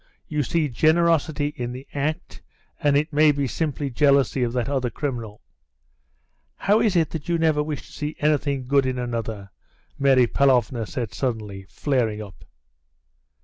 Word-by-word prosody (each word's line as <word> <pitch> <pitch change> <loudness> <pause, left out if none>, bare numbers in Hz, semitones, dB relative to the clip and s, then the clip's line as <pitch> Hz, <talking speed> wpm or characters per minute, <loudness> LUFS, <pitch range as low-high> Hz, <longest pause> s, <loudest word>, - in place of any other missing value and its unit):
You 150 -1 -1
see 155 +3 0
generosity 155 +1 +2
in 120 0 -4
the 130 +2 -9
act, 145 +2 -3 0.4
and 145 -1 +3
it 150 +2 -1
may 150 +1 +5
be 140 -1 -1
simply 145 +2 -2
jealousy 140 0 +3
of 120 -1 +1
that 125 -1 -1
other 135 -3 -1
criminal." 115 -7 -5 1.1
"How 205 +2 +2
is 210 -5 +2
it 165 -3 +2
that 160 0 -6
you 170 - +2
never 160 -2 +2
wish 150 -1 -4
to - - -17
see 150 +1 -4
anything 145 -3 0
good 135 0 +2
in 130 -1 -2
another?" 115 -5 -4 0.5
Mary 135 -3 +5
Pavlovna 125 -3 +2
said 120 -6 -4
suddenly, 105 -6 -4
flaring 120 -7 -1
up. 100 -3 -10
140 Hz, 155 wpm, -23 LUFS, 120-150 Hz, 1.1 s, may